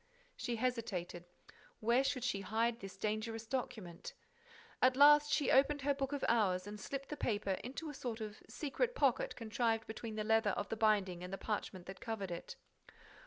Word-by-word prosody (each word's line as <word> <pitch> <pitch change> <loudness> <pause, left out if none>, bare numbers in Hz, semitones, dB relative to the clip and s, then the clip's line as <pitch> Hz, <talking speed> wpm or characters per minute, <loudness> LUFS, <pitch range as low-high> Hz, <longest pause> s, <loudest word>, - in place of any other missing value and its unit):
She 240 - -2
hesitated. 220 -8 -2 0.5
Where 235 +4 +3
should 265 -2 -1
she 200 -6 0
hide 225 +4 0
this 195 -2 -9
dangerous 220 +2 -2
document? 220 -8 -4 0.7
At 255 0 +5
last, 295 +1 +7
she 295 - +2
opened 280 +1 +4
her 285 0 +3
book 275 0 -2
of 285 -2 -1
hours 190 -6 +2
and 210 0 -7
slipped 275 +3 -5
the 300 - -3
paper 205 -7 -1
into 270 +6 -5
a 295 - -5
sort 245 -4 -4
of 215 -1 -6
secret 470 - -1
pocket - - +2
contrived 225 0 0
between 220 0 -6
the 215 - -1
leather 220 -2 +3
of - - -3
the - - -1
binding 200 -5 +2
and 180 - -6
the 195 - -3
parchment 195 -4 -3
that 190 +1 -9
covered 200 -5 -3
it. 170 - -6
225 Hz, 180 wpm, -36 LUFS, 205-265 Hz, 0.7 s, last